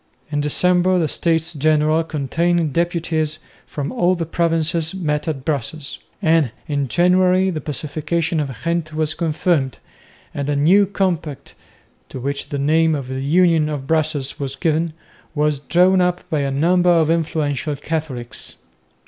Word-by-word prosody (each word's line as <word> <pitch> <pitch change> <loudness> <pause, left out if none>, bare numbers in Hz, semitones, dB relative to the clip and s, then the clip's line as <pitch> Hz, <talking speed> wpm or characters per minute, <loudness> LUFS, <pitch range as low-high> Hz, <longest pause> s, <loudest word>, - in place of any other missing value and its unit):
In 145 -1 0
December 180 +5 +2
the 165 -3 +1
States 165 +1 0
General 155 +1 +2
containing 165 +2 0
deputies 165 -2 -1 0.3
from 145 -2 -4
all 185 -7 +2
the 170 -1 -3
provinces 165 0 0
met 150 -4 -2
at 135 -4 -3
Brussels, 150 0 -3 0.2
and 160 -4 +3 0.2
in 140 -3 -1
January 185 +4 +3
the 155 -3 -4
Pacification 155 +3 -2
of 135 -6 -4
Ghent 165 -2 -2
was 155 0 0
confirmed, 160 -4 0 0.6
and 140 0 -3
a 145 - +1
new 185 +8 +4
compact, 170 -8 -2 0.6
to 130 - -7
which 140 +2 -3
the 145 - -3
name 160 +3 +2
of 135 -3 -5
the 130 0 -3
Union 165 +1 +3
of 145 -3 -4
Brussels 155 -2 -1
was 135 -1 -4
given, 160 +3 0 0.4
was 150 -1 +1
drawn 180 +5 +3
up 180 0 -1
by 155 - +1
a 140 -1 0
number 175 +6 +2
of 165 -2 +4
influential 155 -3 -1
Catholics. 145 -5 -5
155 Hz, 150 wpm, -20 LUFS, 145-170 Hz, 0.6 s, new